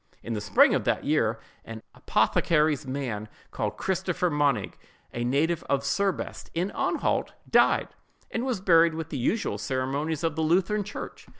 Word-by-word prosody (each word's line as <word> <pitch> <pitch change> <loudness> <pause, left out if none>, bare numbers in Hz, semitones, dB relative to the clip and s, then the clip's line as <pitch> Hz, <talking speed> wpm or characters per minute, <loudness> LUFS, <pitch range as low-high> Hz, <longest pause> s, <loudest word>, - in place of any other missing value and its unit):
In 115 - -4
the 105 - -3
spring 100 -1 +5
of - - +1
that - - 0
year, 115 -7 +1 0.3
an 110 -1 -9
apothecary's 150 -3 +1
man, 120 -6 -4 0.2
called - - -3
Christopher 180 -2 -1
Monig—a 145 -4 -2
native 155 +7 +1
of 140 0 +1
Serbest, 195 +5 -2
in 180 +4 -1
Anhalt—died, - - +1 0.4
and 225 - -2
was 250 -7 -2
buried 165 -3 +5
with 160 -1 -5
the 145 - -4
usual 125 - -1
ceremonies 135 +7 -2
of 165 -2 0
the 160 - -1
Lutheran 185 +6 +2
church. 200 +1 -8
155 Hz, 145 wpm, -27 LUFS, 130-175 Hz, 0.4 s, spring